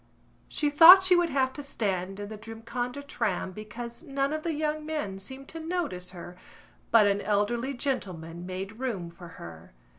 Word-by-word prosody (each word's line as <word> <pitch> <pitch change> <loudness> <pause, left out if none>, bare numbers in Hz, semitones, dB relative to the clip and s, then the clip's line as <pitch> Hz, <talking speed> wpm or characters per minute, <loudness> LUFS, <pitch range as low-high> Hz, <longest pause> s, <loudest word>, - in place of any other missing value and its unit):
She 295 -1 -1
thought 345 +6 +10
she 370 -1 +5
would 350 -1 +2
have 265 -2 +1
to 290 - -7
stand 195 -8 -3
in 205 - -5
the 220 - -6
Drumcondra 230 +5 -5
tram 210 -9 -2
because 230 +4 -8
none 275 -2 -1
of 310 - -2
the 325 -1 -2
young 305 0 -1
men 300 -12 -4
seemed 265 +7 -9
to 325 - -8
notice 320 - -3
her 180 -1 -10 0.5
but 225 -2 +6
an 200 0 +2
elderly 235 +6 0
gentleman 180 - -4
made 195 +4 -6
room 200 -10 -3
for 175 +1 -12
her. 80 -5 -11
235 Hz, 175 wpm, -28 LUFS, 195-290 Hz, 0.5 s, thought